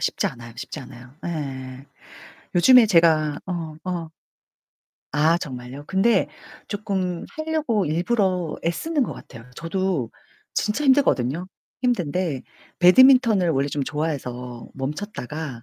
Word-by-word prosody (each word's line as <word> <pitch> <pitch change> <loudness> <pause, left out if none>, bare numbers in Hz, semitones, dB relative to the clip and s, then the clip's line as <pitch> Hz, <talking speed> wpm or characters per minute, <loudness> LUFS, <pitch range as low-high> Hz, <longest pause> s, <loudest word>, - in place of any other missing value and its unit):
쉽지 - - 0
않아요 115 -1 -11
쉽지 - - -6
않아요 125 +1 -12
예. 135 -5 -5 0.7
요즘에 240 +7 +7
제가 160 -6 +3
어 165 -4 -4
어 175 -3 -4 1.0
아 155 +4 +3
정말요? 130 -2 -7
근데 195 0 +3 0.4
조금 190 -4 -2
하려고 310 -9 0
일부러 180 +1 0
애 170 - +3
쓰는거 295 - -1
같아요. 115 -2 -12
저도 170 -6 -1 0.5
진짜 215 +8 0
힘들거든요. 180 - +2 0.3
힘든데 180 - 0 0.4
배드민턴을 220 -1 +6
원래 140 -2 +1
좀 145 0 -2
좋아해서 125 -5 -4
멈췄다가 150 - -5
170 Hz, 255 characters per minute, -23 LUFS, 140-200 Hz, 1.0 s, 요즘에